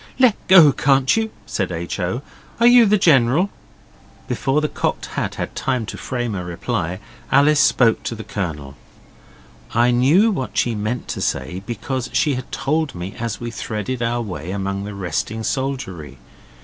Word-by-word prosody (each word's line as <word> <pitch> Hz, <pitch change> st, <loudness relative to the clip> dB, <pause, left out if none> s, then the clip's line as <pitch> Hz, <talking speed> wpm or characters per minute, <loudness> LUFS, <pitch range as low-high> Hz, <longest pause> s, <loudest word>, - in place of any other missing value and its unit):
'Let 255 Hz, -5 st, +5 dB
go, 175 Hz, -6 st, +8 dB
can't 135 Hz, 0 st, +3 dB
you,' 225 Hz, 0 st, 0 dB, 0.2 s
said 95 Hz, -1 st, -2 dB
H. 85 Hz, +3 st, -4 dB
O. 95 Hz, +9 st, -2 dB, 0.4 s
'Are 235 Hz, -, +4 dB
you 240 Hz, -2 st, +7 dB
the 210 Hz, +1 st, +4 dB
General?' 155 Hz, +2 st, +3 dB, 0.8 s
Before 135 Hz, +2 st, 0 dB
the 150 Hz, -, 0 dB
Cocked -, -, -2 dB
Hat -, -, -4 dB
had -, -, -5 dB
time 130 Hz, -4 st, -1 dB
to -, -, -6 dB
frame 120 Hz, -3 st, -3 dB
a 90 Hz, -2 st, -3 dB
reply, 90 Hz, 0 st, -3 dB, 0.3 s
Alice 145 Hz, +2 st, +5 dB
spoke 115 Hz, -3 st, +4 dB
to 115 Hz, -, -3 dB
the 110 Hz, -, -7 dB
Colonel. 75 Hz, -10 st, -5 dB, 1.0 s
I 120 Hz, +1 st, +4 dB
knew 150 Hz, -, +4 dB
what 130 Hz, -10 st, -4 dB
she 120 Hz, -, +2 dB
meant 110 Hz, +3 st, -3 dB
to -, -, -3 dB
say, 90 Hz, +3 st, -2 dB
because 125 Hz, +1 st, -3 dB
she 150 Hz, -4 st, +2 dB
had 130 Hz, 0 st, -6 dB
told 155 Hz, -1 st, -1 dB
me 90 Hz, +3 st, -6 dB
as 115 Hz, -3 st, -3 dB
we 120 Hz, -1 st, -5 dB
threaded 115 Hz, +3 st, -4 dB
our 120 Hz, 0 st, 0 dB
way 90 Hz, -5 st, -6 dB
among 100 Hz, 0 st, -3 dB
the 105 Hz, -1 st, -7 dB
resting 100 Hz, +4 st, -3 dB
soldiery. 105 Hz, -, -3 dB
120 Hz, 170 wpm, -20 LUFS, 100-140 Hz, 1.0 s, go